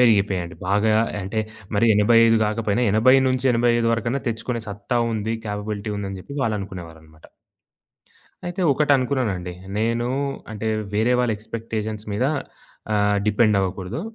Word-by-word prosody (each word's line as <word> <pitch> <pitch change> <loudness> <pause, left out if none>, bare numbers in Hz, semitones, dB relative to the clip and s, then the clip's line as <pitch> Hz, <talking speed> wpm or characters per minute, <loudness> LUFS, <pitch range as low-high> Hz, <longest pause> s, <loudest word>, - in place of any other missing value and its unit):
పెరిగిపోయాయండి. 100 -7 +2
బాగా 105 +2 +3 0.3
అంటే, 100 +4 -2 0.3
మరీ 110 +3 +3
85 115 +2 +5
గాకపోయినా 110 +1 0
80-85 125 0 +3
వరకన్నా 115 +4 -1
తెచ్చుకునే 115 +1 -3
సత్తా 105 +5 -2
ఉంది, 110 +1 -2
కేపబిలిటీ 105 0 -4
ఉందని 95 -1 -5
జెప్పి 140 +9 -9
వాళ్ళనుకునేవారనమాట. 85 -8 -6 1.2
అయితే, 175 +2 -3
ఒకటనుకున్నానండి 130 -10 +1 0.2
నేను. 115 +2 0 0.4
అంటే, 110 +1 -4 0.3
వేరే 110 +4 +2
వాళ్ళ 125 -2 +2
ఎక్స్‌పెక్టేషన్స్ 110 -1 -5
మీద 105 +6 +1 0.7
ఆహ్, 105 0 +2
డిపెండ్ 105 0 +3
అవ్వకూడదు. 95 - -3
110 Hz, 110 wpm, -23 LUFS, 100-120 Hz, 1.2 s, 85